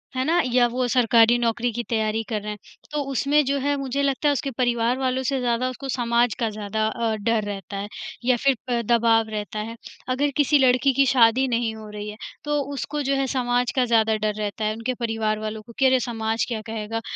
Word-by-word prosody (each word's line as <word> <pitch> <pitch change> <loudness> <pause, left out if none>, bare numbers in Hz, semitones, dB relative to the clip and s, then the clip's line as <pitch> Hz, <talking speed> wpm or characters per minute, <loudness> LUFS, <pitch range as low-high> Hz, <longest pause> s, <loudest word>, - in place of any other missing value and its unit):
है 255 - 0
ना? 335 +4 +2
या 245 -1 +5
वो 250 +1 -1
सरकारी 235 -1 +4
नौकरी 235 +1 0
की 240 - -3
तैयारी 220 -1 0
कर 215 -2 -2
रहे 210 +1 -5
हैं, 210 - -6 0.3
तो 300 -1 -1
उसमें 285 +3 +2
जो 280 +1 0
है 285 +2 0
मुझे 275 0 -2
लगता 280 +2 +1
है - - +3
उसके 280 -1 -3
परिवार 240 0 +1
वालों 260 0 0
से 270 +1 0
ज़्यादा 245 +1 0
उसको 270 +2 -7
समाज 240 -1 +1
का 230 -2 +1
ज़्यादा 215 0 -2
अ, 225 -1 -1
डर 215 +1 0
रहता 200 -1 -6
है 200 +1 -4 0.4
या 255 0 +4
फिर 275 +2 +2
प 240 -1 +1
दबाव 225 -1 +3
रहता 210 0 -4
है। 225 +2 -5 0.3
अगर 280 +3 +1
किसी 290 0 +4
लड़की 260 +1 +4
की 275 +2 +4
शादी 250 0 +4
नहीं 235 -2 0
हो 220 -1 -10
रही 210 0 -6
है, 210 - -9 0.3
तो 295 0 0
उसको 280 +4 -3
जो 275 0 +1
है 270 0 0
समाज 245 -1 0
का 255 -2 +3
ज़्यादा 225 -2 +3
डर 215 0 -1
रहता 215 +1 -3
है, 215 - 0
उनके 230 +3 -2
परिवार 225 -3 -1
वालों 215 0 -5
को, 230 +2 -15
कि 270 - +4
अरे! 260 0 +5
समाज 225 -2 -1
क्या 230 -3 -3
कहेगा? 225 +1 -4
235 Hz, 225 wpm, -23 LUFS, 220-260 Hz, 0.4 s, या